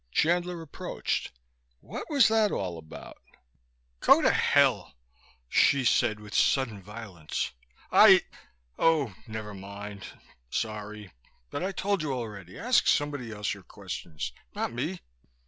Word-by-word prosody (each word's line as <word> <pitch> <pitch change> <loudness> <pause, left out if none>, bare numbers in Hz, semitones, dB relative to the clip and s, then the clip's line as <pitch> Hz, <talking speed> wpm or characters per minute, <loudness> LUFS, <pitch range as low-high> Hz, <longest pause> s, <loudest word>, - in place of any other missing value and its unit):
Chandler 175 - +1
approached. 155 - -3 0.5
"What - - -7
was 280 -5 +5
that 220 -2 +3
all 90 -4 -3
about?" 80 -1 -11 0.8
"Go - - +6
to - - +5
hell!" - - +3 0.5
Hsi 135 - +4
said 110 -2 +3
with 105 -1 -11
sudden 120 -7 +2
violence. 100 -6 -5 0.4
"I - - +8 0.6
Oh 150 -9 +3
never 110 -1 -6
mind. 100 +1 -8 0.4
Sorry. 105 - -4 0.4
But - - -3
I 190 - -1
told 200 0 -1
you 150 -3 -2
already, 105 -7 -6
ask 250 0 +3
somebody 145 -6 +1
else 105 -1 -2
your 100 - -10
questions, 75 -7 -6 0.2
not - - -2
me." - - -3
110 Hz, 125 wpm, -28 LUFS, 100-155 Hz, 0.8 s, I